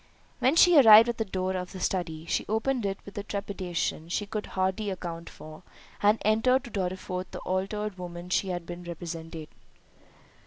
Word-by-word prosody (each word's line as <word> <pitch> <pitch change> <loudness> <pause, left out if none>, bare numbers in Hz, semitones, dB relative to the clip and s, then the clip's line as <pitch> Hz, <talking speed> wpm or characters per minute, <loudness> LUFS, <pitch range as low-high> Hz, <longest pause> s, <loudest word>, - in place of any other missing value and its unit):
When 265 +5 +3
she 340 -2 +7
arrived 225 -2 +9
at 235 - -3
the 225 - 0
door 190 -1 -2
of 180 0 -4
the 190 - -7
study, 165 -4 -2
she - - 0
opened 225 +1 0
it 195 0 -3
with 200 - -11
a - - -4
trepidation 190 -5 -3
she 205 +4 -1
could 210 +1 -4
hardly 190 +3 0
account 170 -3 -6
for, 155 +1 -12 0.4
and 210 +2 +4
entered 235 +5 +3
to 240 - -10
Dorriforth 185 -1 -3
the - - -7
altered 195 +2 -3
woman 175 0 -7
she 195 - +1
has 175 -2 -3
been 175 +1 -8
represented. 165 -2 -7
190 Hz, 180 wpm, -28 LUFS, 175-215 Hz, 0.4 s, arrived